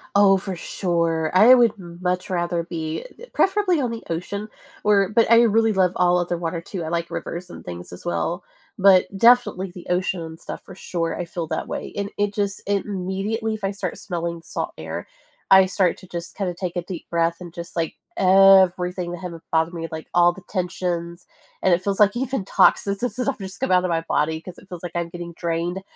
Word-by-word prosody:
Oh, 195 -1 +6
for 190 -1 -5
sure, 170 -3 -1
I 225 +7 +8
would 235 -4 +4
much 180 0 -3
rather 175 -1 0
be 160 - -4 0.3
preferably 385 -4 +2
on 250 -4 -1
the 230 - -5
ocean, 200 +5 -4 0.4
or 200 -2 +4
but 225 +1 +3
I 230 - +8
really 225 0 +3
love 185 -3 +3
all 180 0 +3
other 175 -1 -1
water, 170 0 -3
too, 175 0 -6
I - - -5
like 170 0 -2
rivers 175 +1 -5
and - - -10
things 90 0 -8
as - - -11
well, 85 -1 -2 0.4
but, 190 -1 +6
definitely 230 -5 +4
the 180 - -10
ocean, 180 0 0
and 160 0 -8
stuff, - - -7
for - - -11
sure, 170 -3 -3
I 175 - -2
feel 170 -1 -5
that 160 - -3
way, - - -5
and 200 0 -2
it 205 0 0
just 200 -1 -2
immediately 200 +2 -2
if 215 -1 -7
I 195 - 0
start 195 -3 -4
smelling 170 -3 -4
salt - - -4
air - - -6 0.4
I 190 0 +9
start 185 -1 +1
to 185 - -14
just 170 0 -6
kinda 190 -3 -1
take 175 0 -5
a 175 - -2
deep 180 -2 -8
breath 170 0 +1
and 175 -2 -8
just, 170 -1 -8
like, 165 -2 -1 0.2
everything 185 -2 +5
I - - -10
have 180 -1 -5 0.2
bothered 160 +1 +2
me, 165 -1 -4
like 160 0 -6
all 175 0 +5
the 190 - -12
tensions, 175 -2 -3 0.4
and 185 - +4
it 175 - +2
feels 200 0 -1
like 205 +2 +5
even 260 -4 -2
toxins, 200 0 +3
and 245 - 0
stuff, 255 +2 -2
just 190 0 -7
come 265 - -1
out 180 0 +4
of 180 - -1
my 165 -1 +1
body 160 -1 0
'cause 180 +1 -10
it - - -18
feels 180 -2 -8
like 175 - -5
I'm 170 -1 -2
getting 170 0 -7
drained 170 +2 -2
180 Hz, 215 wpm, -23 LUFS, 170-200 Hz, 0.4 s, I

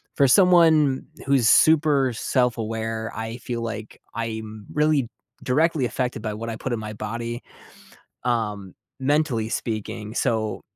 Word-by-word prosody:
for 140 -2 +4
someone 160 -5 +5 0.2
who's 135 -4 +3
super 145 -5 +4
self-aware, 115 -2 -1
I 115 +1 -5
feel 120 -1 -4
like 110 -1 -6
I'm 110 -2 -5
really 150 -5 +2 0.3
directly 150 +1 +2
affected 125 -2 -2
by 110 -1 -3
what 115 +1 -5
I - - -4
put 130 - -5
in 120 - 0
my 110 0 -6
body, 115 +3 -5 0.8
um, 105 -6 -2 0.2
mentally 130 -5 +1
speaking 110 -1 -4
so 110 -3 -1
115 Hz, 130 wpm, -24 LUFS, 110-135 Hz, 0.8 s, someone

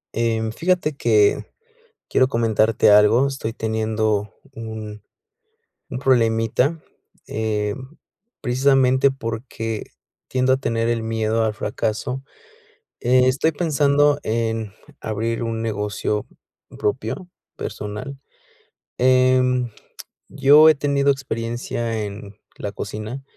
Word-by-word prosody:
Em, 115 -1 0
fíjate 170 +3 0
que 110 -6 +3 0.7
quiero 130 - +3
comentarte 110 -2 +2
algo, 105 +5 +6
estoy 135 -5 -4
teniendo 110 -2 -1 0.2
un 110 -2 -7 0.9
un 125 -4 -5
problemita, 125 +3 +2 0.5
em, 110 +6 -3 0.4
precisamente 130 +1 +3
porque 115 -3 -5 0.4
tiendo 130 0 +2
a - - +4
tener 115 -3 -1
el 115 -1 0
miedo 110 0 0
al 110 -1 -1
fracaso, 110 +5 -3 0.8
estoy 130 +4 +3
pensando 145 -2 +2
en 110 -2 -2 0.3
abrir 115 +2 -2
un 115 -1 -3
negocio 105 -1 -2 0.5
propio, 130 - -2 0.3
personal, 105 +7 -6 0.8
em, 130 -1 +3 0.6
yo 150 +3 +7
he 155 - +5
tenido 140 0 +1
experiencia 115 -3 -3
en 100 0 -9 0.2
la - - -4
cocina, 110 +6 -6
115 Hz, 95 wpm, -21 LUFS, 110-130 Hz, 0.9 s, yo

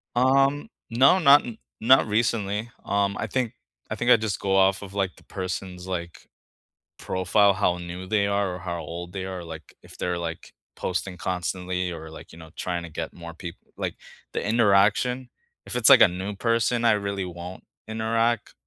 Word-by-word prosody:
Um, 135 - +3 0.2
no, 135 +10 +5
not 145 -4 +7
in 115 -2 -7 0.2
not 130 +2 +6
recently. 110 0 0
Um, 100 0 0
I 115 - -2
think 125 +1 -1 0.4
I - - -1
think 120 +1 +2
I - - +10
just 110 -3 -2
go 95 -1 0
off 95 0 +4
of, 100 -1 -9
like, 95 -2 0
the - - -18
person's, 90 -1 -5
like, 85 -2 -5 0.7
profile, 100 +2 +3
how 90 -3 +1
new 90 +1 -7
they 100 +1 +1
are 100 -2 0
or - - -8
how 85 -2 -4
old 85 +3 -7
they 95 -1 -4
are, 95 -2 -5
like, 80 -1 -10
if - - -15
they're, 90 -1 -2
like, 80 -1 -6 0.2
posting 90 0 -3
constantly 90 0 -2
or, 80 -1 -8
like, - - -12
you 80 - -13
know, 80 -1 -12
trying 85 -1 -3
to 85 - -8
get 80 +1 -5
more 85 -1 -9
peop 85 0 -8 0.2
like, - - -3 0.4
the - - -2
interaction, 115 +3 +3 0.4
if - - -7
it's, 120 -2 +5
like, - - +9
a - - +9
new 95 +3 -5
person, 115 +2 +1
I 115 - +6
really 100 -2 -1
won't 90 +1 -8 0.2
interact, 115 0 0
100 Hz, 185 wpm, -25 LUFS, 90-115 Hz, 0.7 s, I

